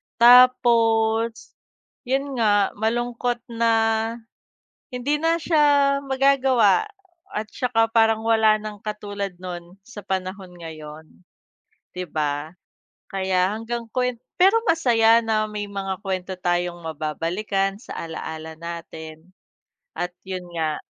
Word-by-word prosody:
Tapos 230 Hz, -2 st, +4 dB, 0.6 s
yun 270 Hz, -1 st, -1 dB
nga 205 Hz, -3 st, +3 dB
malungkot 240 Hz, +2 st, -1 dB, 0.2 s
na 230 Hz, 0 st, +2 dB, 1.2 s
hindi 280 Hz, +4 st, -1 dB
na 330 Hz, +1 st, +3 dB
siya 290 Hz, -4 st, +3 dB
magagawa 270 Hz, -, +3 dB, 0.5 s
at 215 Hz, +1 st, -2 dB
tsaka 225 Hz, -3 st, +1 dB
parang 225 Hz, -1 st, +3 dB
wala 220 Hz, -1 st, +4 dB
nang 210 Hz, -1 st, -7 dB
katulad 205 Hz, -3 st, -5 dB
nun 175 Hz, 0 st, -7 dB
sa 215 Hz, 0 st, -11 dB
panahon 185 Hz, -1 st, -4 dB
ngayon. 155 Hz, -2 st, -10 dB, 0.9 s
'Di 180 Hz, -1 st, -4 dB
ba? 150 Hz, +1 st, -3 dB, 0.6 s
Kaya 190 Hz, 0 st, +1 dB
hanggang 230 Hz, +2 st, -4 dB
kuwen 250 Hz, -1 st, 0 dB, 0.2 s
pero 390 Hz, +5 st, +6 dB
masaya 230 Hz, -8 st, +4 dB
na 215 Hz, -1 st, +1 dB
may 205 Hz, -1 st, -5 dB
mga 195 Hz, -2 st, -4 dB
kwento 190 Hz, -1 st, -3 dB
tayong 175 Hz, 0 st, -1 dB
mababalikan 170 Hz, +6 st, -2 dB
sa -, -, -9 dB
alaala 160 Hz, -1 st, -6 dB
natin 165 Hz, 0 st, -9 dB, 0.7 s
at 175 Hz, 0 st, -3 dB
yun 185 Hz, -2 st, -6 dB
nga. 155 Hz, -2 st, -2 dB
210 Hz, 110 wpm, -23 LUFS, 180-240 Hz, 1.2 s, pero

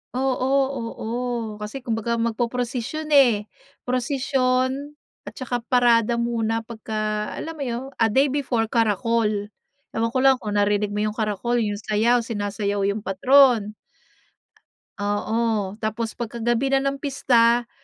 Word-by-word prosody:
Oo, 260 Hz, 0 st, 0 dB, 0.2 s
oo, 230 Hz, -3 st, -5 dB, 0.5 s
kasi 215 Hz, +5 st, -6 dB
kumbaga, 230 Hz, 0 st, -1 dB
magpoprosisyon 240 Hz, +6 st, -2 dB
eh, 245 Hz, -8 st, +5 dB, 0.4 s
prosisyon 260 Hz, +2 st, 0 dB, 0.3 s
at -, -, -8 dB
saka 245 Hz, -2 st, -3 dB
parada 235 Hz, -1 st, +3 dB
muna 230 Hz, -1 st, -1 dB
pagka, 215 Hz, -2 st, -3 dB
alam 325 Hz, -, -5 dB
mo -, -, -2 dB
'yon, 235 Hz, +1 st, -3 dB, 0.2 s
a 225 Hz, -, +4 dB
day 265 Hz, +5 st, +2 dB
before, 245 Hz, -6 st, -1 dB
karakol, 230 Hz, 0 st, +2 dB, 0.6 s
ewan 230 Hz, +1 st, -1 dB
ko -, -, +3 dB
lang 265 Hz, -1 st, +5 dB
kung 210 Hz, -3 st, -4 dB
narinig 205 Hz, 0 st, +1 dB
mo 210 Hz, -, 0 dB
yung 215 Hz, -, 0 dB
karakol, 220 Hz, +3 st, 0 dB
yung 205 Hz, -2 st, -1 dB
sayaw, 225 Hz, +3 st, +1 dB
sinasayaw 205 Hz, -2 st, -2 dB
yung 205 Hz, +1 st, -2 dB
patron. 225 Hz, +1 st, +4 dB, 1.2 s
Oo, 205 Hz, 0 st, -1 dB
tapos 220 Hz, +1 st, -3 dB
pagka 235 Hz, 0 st, -5 dB
gabi 240 Hz, +4 st, +1 dB
na 270 Hz, -, +4 dB
ng 275 Hz, 0 st, -1 dB
pista, 240 Hz, -4 st, +2 dB
230 Hz, 130 wpm, -23 LUFS, 215-255 Hz, 1.2 s, eh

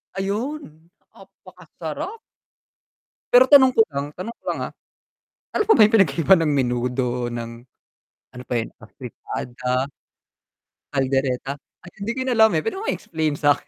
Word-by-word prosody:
'Ayun! 195 Hz, -, -5 dB, 0.3 s
Apakasarap. 190 Hz, -, -9 dB, 1.1 s
Pero 250 Hz, +1 st, +8 dB
tanong 265 Hz, -3 st, +8 dB
ko 225 Hz, -, +5 dB
lang 140 Hz, 0 st, -3 dB
tanong 220 Hz, +8 st, -7 dB
ko -, -, -46 dB
lang, -, -, -5 dB
ah, -, -, -20 dB, 0.8 s
ano -, -, +2 dB
pa 445 Hz, -, +6 dB
ba 225 Hz, -, +5 dB
yung 215 Hz, -, 0 dB
pinag-iba 170 Hz, -1 st, +4 dB
ng 160 Hz, -2 st, +1 dB
menudo, 125 Hz, -1 st, -1 dB
ng 120 Hz, -1 st, -5 dB, 0.9 s
ano 125 Hz, -, -8 dB
pa -, -, -3 dB
'yun, 115 Hz, -, -4 dB
afritida, 125 Hz, +2 st, -5 dB, 1.1 s
caldereta, 135 Hz, -1 st, 0 dB, 0.3 s
ay, 180 Hz, -, -10 dB
hindi 215 Hz, +4 st, -2 dB
ko -, -, -2 dB
alam, 220 Hz, -1 st, +6 dB
eh, 155 Hz, -, +1 dB
pero 385 Hz, +2 st, -3 dB
ma-explain 160 Hz, -, -2 dB
mo -, -, -17 dB
sa 145 Hz, 0 st, +5 dB
'kin? -, -, -27 dB
160 Hz, 145 wpm, -22 LUFS, -, 1.1 s, Pero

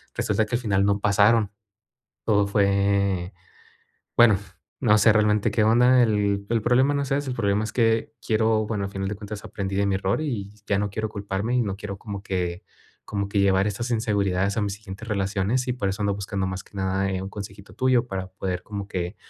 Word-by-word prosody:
Resulta 110 Hz, -, +1 dB
que 120 Hz, -, -2 dB
al 120 Hz, -, -1 dB
final 100 Hz, -3 st, +1 dB
no 100 Hz, 0 st, +2 dB
pasaron. 105 Hz, +1 st, +3 dB, 0.7 s
Todo 105 Hz, -2 st, +3 dB
fue 100 Hz, -2 st, +1 dB, 0.8 s
bueno, 115 Hz, -4 st, +7 dB, 0.4 s
no 110 Hz, -4 st, +5 dB
sé, 110 Hz, -, +6 dB
realmente 105 Hz, -1 st, +3 dB
qué 110 Hz, -, +2 dB
onda. 125 Hz, +3 st, +5 dB
El 100 Hz, -2 st, +1 dB
el 115 Hz, -2 st, +1 dB
problema 130 Hz, +5 st, +3 dB
no 140 Hz, -, 0 dB
es 135 Hz, -, -7 dB
ese, 140 Hz, -1 st, 0 dB
el -, -, -4 dB
problema 105 Hz, -1 st, +1 dB
es 110 Hz, -, -6 dB
que 115 Hz, -2 st, +1 dB
quiero 110 Hz, 0 st, +2 dB
Bueno, 105 Hz, -3 st, -2 dB
al 100 Hz, -, -6 dB
final 95 Hz, -1 st, -3 dB
de 105 Hz, -, -3 dB
cuentas, 105 Hz, 0 st, -8 dB
aprendí 95 Hz, -1 st, -4 dB
de 100 Hz, 0 st, +2 dB
mi 95 Hz, -, +1 dB
error, 95 Hz, +9 st, 0 dB
y 105 Hz, -10 st, -3 dB, 0.2 s
ya 100 Hz, -, +2 dB
no 105 Hz, 0 st, -1 dB
quiero 110 Hz, +1 st, -3 dB
culparme. 100 Hz, +4 st, -2 dB
Y 125 Hz, -, +3 dB
no 100 Hz, -2 st, -3 dB
quiero 100 Hz, -2 st, -6 dB
como 100 Hz, -2 st, -7 dB
que 90 Hz, -1 st, -2 dB, 0.4 s
como 100 Hz, -1 st, -2 dB
que 100 Hz, -, 0 dB
llevar 95 Hz, 0 st, +3 dB
esas 120 Hz, +5 st, -3 dB
inseguridades 100 Hz, -3 st, 0 dB
a -, -, +2 dB
mis 100 Hz, -1 st, -1 dB
siguientes 105 Hz, +1 st, -10 dB
relaciones. 105 Hz, +5 st, 0 dB
Y 125 Hz, -, 0 dB
por 100 Hz, -6 st, -2 dB
eso 95 Hz, +2 st, -4 dB
ando 100 Hz, -1 st, +1 dB
buscando 100 Hz, -1 st, -3 dB
más 95 Hz, 0 st, -5 dB
que -, -, -21 dB
nada, 95 Hz, 0 st, 0 dB
eh, 95 Hz, 0 st, -2 dB
un 95 Hz, -, -6 dB
consejito 100 Hz, -1 st, -9 dB
tuyo, 130 Hz, -2 st, +2 dB
para 95 Hz, -2 st, -4 dB
poder 90 Hz, -1 st, -4 dB
como 100 Hz, -1 st, -6 dB
que 90 Hz, 0 st, -4 dB
100 Hz, 215 wpm, -24 LUFS, 100-110 Hz, 0.8 s, bueno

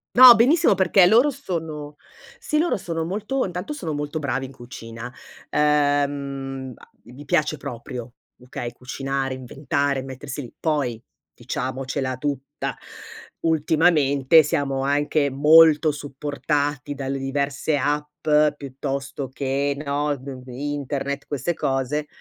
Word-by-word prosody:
No, 250 Hz, -1 st, +11 dB
benissimo 280 Hz, +8 st, +4 dB
perché 190 Hz, -1 st, +5 dB
loro 235 Hz, +10 st, +5 dB
sono 160 Hz, -, -5 dB, 0.4 s
sì, 305 Hz, -, -2 dB
loro 340 Hz, +3 st, +2 dB
sono 165 Hz, -4 st, -3 dB
molto 215 Hz, +9 st, -2 dB
intanto 180 Hz, -, -5 dB
sono 170 Hz, -, -4 dB
molto 145 Hz, +2 st, -3 dB
bravi 135 Hz, -2 st, -2 dB
in -, -, -13 dB
cucina. 120 Hz, -1 st, -9 dB, 0.4 s
Ehm, 140 Hz, -3 st, 0 dB, 0.3 s
gli 130 Hz, +4 st, -13 dB
piace 155 Hz, +1 st, +1 dB
proprio, 120 Hz, -2 st, -7 dB, 0.3 s
okay, 120 Hz, -1 st, -6 dB
cucinare, 135 Hz, +1 st, -3 dB
inventare, 140 Hz, +1 st, -1 dB
mettersi 135 Hz, +2 st, -7 dB
lì. 120 Hz, -, -10 dB
Poi, 135 Hz, -8 st, -1 dB, 0.3 s
diciamocela 130 Hz, 0 st, -3 dB
tutta, 140 Hz, -1 st, -4 dB, 0.7 s
ultimamente 155 Hz, -2 st, +4 dB
siamo 135 Hz, -2 st, -1 dB
anche 145 Hz, +1 st, +1 dB
molto 155 Hz, +2 st, +6 dB
supportati 145 Hz, 0 st, -2 dB
dalle 135 Hz, 0 st, -3 dB
diverse 140 Hz, +2 st, -1 dB
app, 150 Hz, +2 st, -2 dB, 0.3 s
piuttosto 135 Hz, 0 st, -5 dB
che, 140 Hz, +1 st, -1 dB
no, 145 Hz, 0 st, -1 dB
d 130 Hz, +2 st, -13 dB, 0.2 s
n 125 Hz, -, -10 dB
internet, 140 Hz, +1 st, -3 dB
queste 145 Hz, +4 st, -2 dB
cose. 135 Hz, +2 st, -1 dB
145 Hz, 115 wpm, -23 LUFS, 135-155 Hz, 0.7 s, No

